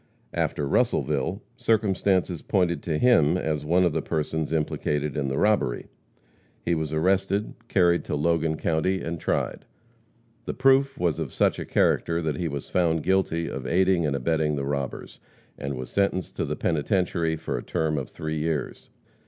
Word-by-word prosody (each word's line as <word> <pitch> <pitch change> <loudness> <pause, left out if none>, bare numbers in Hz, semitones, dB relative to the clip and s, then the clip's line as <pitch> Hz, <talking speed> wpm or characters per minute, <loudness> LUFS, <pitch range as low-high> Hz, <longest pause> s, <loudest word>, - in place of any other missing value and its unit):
After 70 - -1
Russellville, 70 0 0
circumstances 95 -5 +1
pointed 90 -3 +1
to 80 -3 -1
him 85 -7 +4
as 80 -4 -2
one 85 +4 +3
of 85 -3 +2
the - - 0
persons 80 0 -2
implicated 75 -2 -1
in 70 -2 -1
the 65 +1 -2
robbery. 105 - +1 0.8
He 85 - +2
was 80 -2 -2
arrested, 95 +5 +1
carried 85 -3 +3
to - - -2
Logan 80 +1 +1
county 85 +4 0
and 85 0 -4
tried. - - -1 0.8
The - - -4
proof 135 +1 +3
was 85 -4 0
of - - -3
such - - +1
a - - -4
character 85 0 +2
that 80 -3 -2
he 85 - -1
was 70 -2 -5
found 80 -3 +1
guilty 90 -3 +1
of 65 -2 -5
aiding 90 0 +3
and 70 - 0
abetting 75 +2 0
the 70 -1 -2
robbers, 70 -1 -4 0.4
and 70 0 -4
was 65 0 -7
sentenced 100 -2 0
to - - 0
the - - -2
penitentiary 85 0 0
for - - -4
a - - -4
term 80 -2 -1
of 65 - -6
three 80 0 -4
years. 75 -3 -3
80 Hz, 170 wpm, -25 LUFS, 75-90 Hz, 0.8 s, him